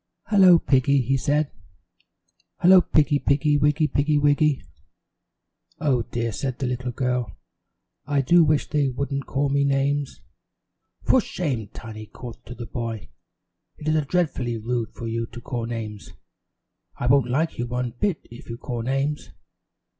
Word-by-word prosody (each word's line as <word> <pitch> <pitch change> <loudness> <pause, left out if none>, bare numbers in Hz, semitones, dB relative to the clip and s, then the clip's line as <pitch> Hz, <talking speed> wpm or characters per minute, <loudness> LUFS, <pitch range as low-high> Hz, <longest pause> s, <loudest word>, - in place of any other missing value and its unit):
"Hello, 190 -5 +7
Piggy," 140 -2 +2
he 135 +3 +1
said. 145 +3 0 1.1
"Hello, 185 +1 +7
Piggy. 150 -3 +2
Piggy 145 +2 +2
wiggy, 150 +1 +2
Piggy 150 +1 +1
wiggy." 145 0 +2 1.2
"Oh, 140 -5 +2
dear," 115 0 -3
said 125 +5 -3
the 135 - -3
little 125 0 -2
girl, 125 - -2 0.7
"I 145 -1 +2
do 170 +6 +5
wish 150 -1 +2
they 145 -2 +1
wouldn't 140 +1 -3
call 140 +1 0
me 140 0 +2
names." 140 0 0 0.8
"For 260 - +4
shame!" 135 - -3
Tiny 110 +1 -9
called 120 +1 -10
to 120 - -8
the 120 - -7
boy. 115 -3 -5 0.7
"It 150 - -8
is 155 -1 +1
dreadfully 135 -9 0
rude 115 +1 -2
for 120 - -7
you 115 0 -2
to 120 - -10
call 120 -1 -4
names. 110 -3 -6 0.8
I - - -4
won't 125 0 +4
like 155 +4 0
you 120 - -1
one 125 0 -2
bit 200 -6 -1
if 120 - -12
you 115 - -5
call 120 -1 -4
names." 135 +4 -2
135 Hz, 150 wpm, -24 LUFS, 120-150 Hz, 1.2 s, Hello